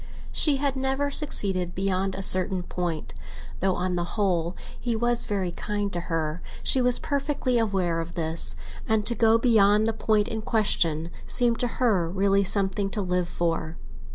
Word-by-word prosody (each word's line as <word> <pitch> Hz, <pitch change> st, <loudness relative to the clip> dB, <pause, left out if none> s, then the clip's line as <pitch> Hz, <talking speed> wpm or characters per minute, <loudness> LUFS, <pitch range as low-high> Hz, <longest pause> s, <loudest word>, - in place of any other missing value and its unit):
She 295 Hz, -3 st, +3 dB
had 280 Hz, 0 st, -1 dB
never 270 Hz, +2 st, -1 dB
succeeded 190 Hz, -, 0 dB
beyond 190 Hz, 0 st, -1 dB
a 195 Hz, -, -4 dB
certain 185 Hz, 0 st, +3 dB
point. 175 Hz, -4 st, -4 dB, 0.5 s
Though, 190 Hz, 0 st, +1 dB
on 180 Hz, 0 st, -2 dB
the 175 Hz, -, -1 dB
whole, 175 Hz, -4 st, 0 dB, 0.2 s
he 240 Hz, -2 st, -2 dB
was 240 Hz, +1 st, +1 dB
very 195 Hz, -4 st, -2 dB
kind 205 Hz, +2 st, -3 dB
to 175 Hz, -, -1 dB
her, 160 Hz, 0 st, -2 dB, 0.2 s
she 260 Hz, -, +5 dB
was 250 Hz, 0 st, +5 dB
perfectly 280 Hz, -3 st, -1 dB
aware 190 Hz, -6 st, 0 dB
of 165 Hz, +1 st, -6 dB
this, 160 Hz, -, -1 dB, 0.3 s
and 220 Hz, -1 st, +1 dB
to 235 Hz, -, +3 dB
go 225 Hz, -1 st, +4 dB
beyond 215 Hz, -3 st, +4 dB
the 225 Hz, -, 0 dB
point 215 Hz, -1 st, +1 dB
in 225 Hz, -2 st, -3 dB
question 170 Hz, -7 st, +1 dB, 0.2 s
seemed 240 Hz, -2 st, +2 dB
to 245 Hz, -, +1 dB
her 200 Hz, -10 st, +1 dB
really 195 Hz, +2 st, +2 dB
something 195 Hz, 0 st, 0 dB
to 205 Hz, -, -3 dB
live 180 Hz, -1 st, -1 dB
for. 165 Hz, -2 st, -2 dB
195 Hz, 170 wpm, -25 LUFS, 175-230 Hz, 0.5 s, she